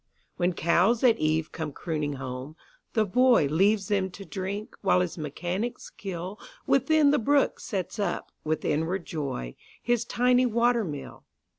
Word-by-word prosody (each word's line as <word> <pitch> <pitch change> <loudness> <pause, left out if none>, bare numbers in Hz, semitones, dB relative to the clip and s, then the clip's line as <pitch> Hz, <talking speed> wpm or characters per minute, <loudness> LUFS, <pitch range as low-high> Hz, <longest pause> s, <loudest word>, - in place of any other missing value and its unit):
When 180 0 +1
cows 175 +9 +2
at 235 -3 +5
eve 155 +1 0
come 160 -2 -4
crooning 150 -1 -3
home, 130 +2 -6 0.4
the 220 -2 +3
boyLeaves 205 - +3
them 195 -2 +1
to 195 - -9
drink, 195 +4 -5
while 185 -2 +3
his 180 -2 -2
mechanic 175 - -3
skillWithin 270 - 0
the 295 - +3
brook 280 +5 +2
sets 195 +2 -4
up, 205 - -2
with 155 0 -2
inward 165 +5 0
joy, 135 - -4 0.3
His 240 -1 +1
tiny 250 +1 +3
water 235 0 +2
mill. 145 -6 -7
190 Hz, 140 wpm, -27 LUFS, 160-235 Hz, 0.4 s, at